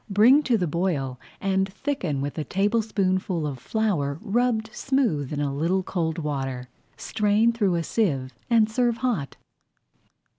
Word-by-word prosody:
Bring 230 +9 +6
to 240 -3 +3
the 180 - 0
boil 150 -6 -1 0.2
and 190 0 0
thicken 190 - -2
with 145 +1 -3
a - - -1
tablespoonful 195 -4 0
of 140 -4 -4
flour 150 - -1
rubbed 225 0 0
smooth 230 - 0
in 150 - -2
a 145 -1 -1
little 170 +6 0
cold 165 -3 -2
water. 135 -5 -3 0.3
Strain 210 +8 +2
through 205 -6 +1
a 170 - 0
sieve 140 - 0 0.2
and 225 -2 +5
serve 235 +1 +1
hot. 190 - -1
190 Hz, 145 wpm, -25 LUFS, 145-220 Hz, 0.3 s, Bring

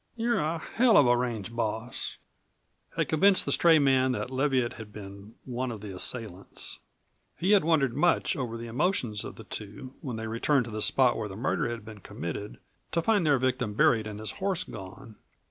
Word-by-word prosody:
"You're 235 +1 +1
a 155 +3 0
hell 230 +7 +3
of 145 - +7
a 120 0 +5
range 115 -3 -3
boss," 110 +1 -3 0.8
had - - +1
convinced 190 +5 +4
the - - -1
stray 165 -2 +5
man 130 -3 +3
that 125 - -4
Leviatt 130 -2 +1
had 110 -2 -9
been 100 +1 -10
one 125 0 -3
of 110 -3 -7
the 100 -3 -7
assailants. 100 -1 -4 0.6
He 185 +4 +1
had 205 -4 +6
wondered 150 -6 +2
much 170 +4 +2
over 120 -4 -3
the 115 - -7
emotions 120 - 0
of - - -7
the 110 - -10
two 105 +6 -8
when 130 -8 -4
they 110 0 -4
returned 120 +4 +1
to 115 - -8
the 110 0 -4
spot 125 +1 +3
where 105 -2 -3
the 95 - -7
murder 120 +2 0
had 115 -3 -6
been 110 -1 -10
committed, 90 +2 -6 0.4
to 170 0 +1
find 205 -6 +3
their 145 -2 +5
victim 125 -4 -1
buried 110 0 +3
and 105 -1 -7
his 110 - -3
horse 190 -2 0
gone. 105 - -10
120 Hz, 195 wpm, -28 LUFS, 110-145 Hz, 0.8 s, of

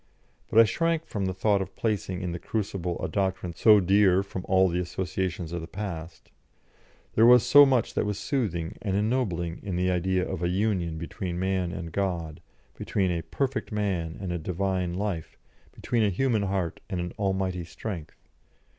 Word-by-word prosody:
But - - -1
I - - +10
shrank 165 +8 0
from 100 -10 -2
the 95 - -2
thought 100 +1 +2
of 95 - -6
placing 95 -4 -2
in 90 - -2
the 85 - -4
crucible 95 -5 -3
a - - -1
doctrine 95 -1 -1
so 105 +5 +6
dear 95 0 +4
from 95 -2 -6
all 95 0 +4
the 90 0 -1
associations 90 -1 -3
of 85 -1 -3
the 80 - -7
past; 85 -4 -7 0.8
there 115 +2 +6
was 125 -1 +7
so 145 0 +8
much 130 -4 +1
that - - +1
was 105 -1 -2
soothing 100 - -2
and 100 -3 -1
ennobling 100 -7 -1
in 95 -3 -4
the 90 +1 +1
idea 90 +1 0
of - - -4
a 85 - +1
union 90 -4 0
between 85 +2 -5
Man 95 -1 0
and 85 -2 -6
God, 85 -5 -2 0.3
between 95 -2 0
a 85 -1 -1
perfect 135 - -2
man 95 -6 -2
and 95 -3 -4
a 85 - -2
Divine 90 +1 -1
life, 95 -5 -3 0.3
between 120 - -1
a 105 - +3
human 115 +2 +1
heart 95 -4 -2
and 95 -4 -2
an 90 0 -4
almighty 95 -3 -1
strength. 85 -2 -7
95 Hz, 180 wpm, -27 LUFS, 85-105 Hz, 0.8 s, I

